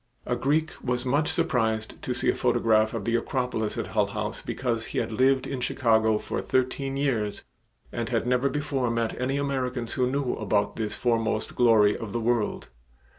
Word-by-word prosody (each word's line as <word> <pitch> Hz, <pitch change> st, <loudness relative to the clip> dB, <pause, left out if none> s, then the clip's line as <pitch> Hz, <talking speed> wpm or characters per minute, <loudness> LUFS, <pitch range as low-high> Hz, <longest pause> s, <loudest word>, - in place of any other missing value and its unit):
A 125 Hz, -, 0 dB
Greek 150 Hz, +6 st, +1 dB
was 125 Hz, 0 st, -1 dB
much 145 Hz, +5 st, +2 dB
surprised 110 Hz, -3 st, 0 dB
to 125 Hz, -, -2 dB
see 120 Hz, -, +1 dB
a -, -, +4 dB
photograph 115 Hz, -3 st, +2 dB
of 105 Hz, -4 st, -4 dB
the 115 Hz, -, 0 dB
Acropolis 120 Hz, -3 st, -1 dB
at -, -, -2 dB
Hull -, -, +1 dB
House -, -, -4 dB
because 115 Hz, -3 st, -2 dB
he -, -, -5 dB
had -, -, -1 dB
lived 130 Hz, +3 st, +3 dB
in 130 Hz, -2 st, -4 dB
Chicago 110 Hz, -4 st, +2 dB
for -, -, -3 dB
thirteen 135 Hz, +1 st, -1 dB
years 115 Hz, -8 st, -1 dB, 0.5 s
and -, -, -3 dB
had -, -, 0 dB
never 125 Hz, +2 st, +2 dB
before 145 Hz, -4 st, -1 dB
met 115 Hz, +1 st, -1 dB
any 135 Hz, +2 st, 0 dB
Americans 130 Hz, -4 st, -2 dB
who 125 Hz, -1 st, +1 dB
knew 140 Hz, -1 st, -1 dB
about 105 Hz, -1 st, 0 dB
this 105 Hz, -1 st, -3 dB
foremost 115 Hz, -2 st, 0 dB
glory 110 Hz, -4 st, +5 dB
of 115 Hz, -4 st, -6 dB
the 120 Hz, -, 0 dB
world. 115 Hz, -1 st, -1 dB
120 Hz, 180 wpm, -26 LUFS, 110-130 Hz, 0.5 s, glory